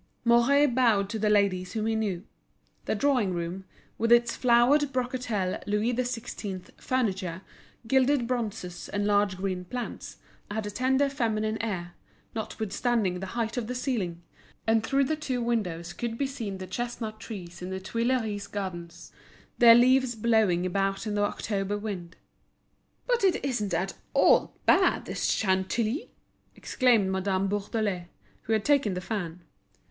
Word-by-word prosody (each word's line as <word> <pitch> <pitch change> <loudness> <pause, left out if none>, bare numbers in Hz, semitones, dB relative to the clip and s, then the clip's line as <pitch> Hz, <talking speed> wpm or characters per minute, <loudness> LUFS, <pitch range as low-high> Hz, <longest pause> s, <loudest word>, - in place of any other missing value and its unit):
Mouret 240 +5 +5
bowed 225 -6 +3
to 220 - -3
the 210 0 +2
ladies 195 -3 +2
whom 220 -1 -1
he 225 - +1
knew. 200 -5 -1 0.6
The - - 0
drawing 250 -10 +1
room, 175 +3 -4 0.3
with 230 +1 +1
its 235 0 +5
flowered 255 +4 +4
brocatel 245 -7 -1
Louis 210 +4 +1
XVI. 230 -6 -4
furniture, 190 -8 -1 0.4
gilded 265 +1 +3
bronzes 225 -7 -4
and 205 0 -1
large 205 -2 +2
green 185 -1 -2
plants, 245 +5 -6 0.3
had 210 +1 -3
a 205 - -4
tender 265 +5 +2
feminine 220 -5 -1
air, 180 -6 -4 0.4
notwithstanding 220 -2 -1
the 190 - -5
height 230 +1 -1
of 235 -3 -2
the 250 - -4
ceiling; 200 -10 -2 0.4
and 225 0 +3
through 275 +4 +2
the 310 +4 0
two 265 -5 -3
windows 180 -8 -2
could 230 +2 -4
be 280 - 0
seen 230 -8 -5
the 190 - -6
chestnut 220 +2 -4
trees 180 -7 -8
in 180 - -5
the 190 0 -3
Tuileries 225 0 -1
Gardens, 175 -4 -6 0.5
their 230 -1 +9
leaves 255 0 +4
blowing 215 -6 +2
about 195 +3 -1
in 210 - -2
the 205 - 0
October 205 0 -1
wind. 190 -5 -6 0.9
"But 485 -3 +1
it 375 -7 +2
isn't 210 -9 -1
at 190 +3 -1 0.2
all - - +4
bad, - - +4
this - - -3
Chantilly!" 215 - 0 0.5
exclaimed 230 -7 +2
Madame 190 0 0
Bourdelais, 205 -2 -2 0.3
who 225 - -2
had 215 -2 +1
taken 280 -10 +3
the - - -2
fan. 180 -4 -4
215 Hz, 150 wpm, -28 LUFS, 190-240 Hz, 0.9 s, their